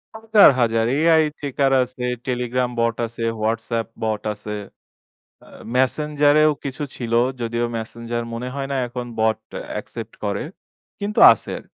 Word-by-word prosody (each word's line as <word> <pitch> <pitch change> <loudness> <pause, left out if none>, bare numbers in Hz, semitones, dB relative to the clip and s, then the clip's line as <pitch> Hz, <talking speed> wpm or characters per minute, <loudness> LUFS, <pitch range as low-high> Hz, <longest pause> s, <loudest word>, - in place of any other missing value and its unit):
হাজার, 220 -4 +6
হাজার, 115 -1 +2
AI 160 0 +5 0.2
checker 140 -1 0
আছে। 125 0 -7 0.2
Telegram 125 0 -1
বট 115 0 +1
আছে, 115 0 -7 0.2
WhatsApp 115 +1 -1 0.2
বট 110 -1 -1
আছে। 105 +1 -9 0.9
আ - - -19 0.3
Messenger 145 +2 +2
এও 155 - +5
কিছু 140 +2 -4
ছিল। 115 -2 -5 0.3
যদিও 120 +1 -1
Messenger 115 +1 -5
মনে 125 +2 -4
হয় 135 -1 -3
না - - 0
এখন 120 0 -6
বট 110 -1 +2 0.3
অ্যাকসেপ্ট 115 -1 -7
করে। 100 -1 -1 0.6
কিন্তু 205 +1 -1
আছে। - - -5
120 Hz, 135 wpm, -21 LUFS, 115-140 Hz, 0.9 s, হাজার